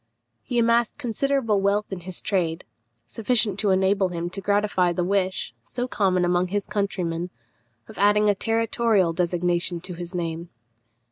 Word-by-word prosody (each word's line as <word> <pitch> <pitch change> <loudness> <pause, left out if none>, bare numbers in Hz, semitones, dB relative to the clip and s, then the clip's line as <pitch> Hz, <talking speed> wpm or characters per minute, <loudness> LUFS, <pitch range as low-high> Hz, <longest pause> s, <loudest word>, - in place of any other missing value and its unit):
He 245 - -4
amassed 235 0 +2
considerable 250 -4 0
wealth 200 +1 +1
in 190 - -4
his 180 0 -3
trade, 175 -4 -1 0.4
sufficient 220 - 0
to 205 -1 +1
enable 190 +1 +3
him 175 0 -4
to 195 - -6
gratify 200 -3 +2
the 180 - -1
wish, 185 -7 -1
so 245 - -4
common 185 -6 +1
among 175 +1 +2
his 200 +2 -2
countrymen, 180 -4 -2 0.6
of - - -11
adding 210 +1 +4
a 205 - +5
territorial 225 -4 +1
designation 175 0 0
to 180 +1 -7
his 175 +1 -7
name. 170 0 -3
190 Hz, 150 wpm, -24 LUFS, 175-210 Hz, 0.6 s, a